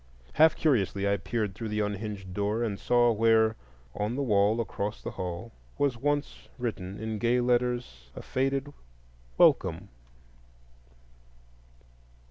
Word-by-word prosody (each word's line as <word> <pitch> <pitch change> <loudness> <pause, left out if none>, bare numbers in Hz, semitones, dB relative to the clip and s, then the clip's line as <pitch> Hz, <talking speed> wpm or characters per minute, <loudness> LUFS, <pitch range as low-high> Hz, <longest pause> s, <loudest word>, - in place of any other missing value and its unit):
Half 160 +1 +5
curiously 100 - +1
I 100 0 +2
peered 105 -2 -2
through 110 +3 -6
the 105 0 -1
unhinged 105 -2 -4
door, 105 +4 -1
and 105 -4 -2
saw 120 -1 +3
where, 110 0 +3 0.4
on 105 +4 -2
the 140 - -1
wall 105 -1 +3
across 105 -2 -3
the - - -6
hall, 90 +5 -5 0.3
was 140 -3 +1 0.6
written 100 -6 -4
in 110 +1 -5
once 110 -1 -3
gay 120 +1 +3
letters 120 - -1
a - - -8
faded 135 +2 -1 0.6
"Welcome." - - +3
110 Hz, 125 wpm, -28 LUFS, 100-120 Hz, 0.6 s, Half